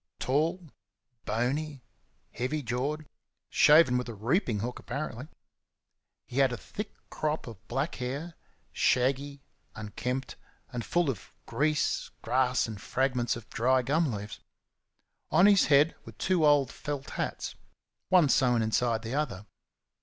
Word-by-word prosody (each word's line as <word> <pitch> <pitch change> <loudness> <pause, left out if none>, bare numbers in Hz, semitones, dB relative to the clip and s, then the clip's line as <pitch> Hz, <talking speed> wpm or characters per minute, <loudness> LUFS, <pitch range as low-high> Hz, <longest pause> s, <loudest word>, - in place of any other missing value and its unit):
Tall, 160 +7 0 0.6
bony, 135 +5 -1 0.5
heavy 135 +5 -2
jawed, 135 +6 -2 0.5
shaven 150 -5 +6
with 125 - -5
a 115 - -6
reaping 115 - 0
hook, 120 +2 -4
apparently. 130 0 -5 1.0
He 130 - -3
had 135 -2 +4
a 120 - -3
thick 210 - -7 0.2
crop 155 0 -2
of 105 -3 -11
black 140 +5 -1
hair 140 +7 -4 0.4
shaggy, 140 +2 +1 0.3
unkempt, 125 +4 -4 0.4
and 120 -1 -3
full 175 0 +1
of 110 - -11
grease, 150 +1 0
grass, 125 +1 +2
and 105 -3 -7
fragments 125 -1 0
of 115 -1 -9
dry 130 +2 +2
gum 150 +3 +1
leaves. 105 -1 -6 0.9
On 185 - +5
his 200 -2 +6
head 150 +2 +5
were - - -11
two 175 -4 +2
old 140 -4 +4
felt 145 0 -5
hats - - -3 0.6
one 180 -5 +6
sewn 125 -4 +3
inside 115 +1 +1
the 115 +2 -4
other. 125 -9 -2
130 Hz, 130 wpm, -29 LUFS, 120-150 Hz, 1.0 s, shaven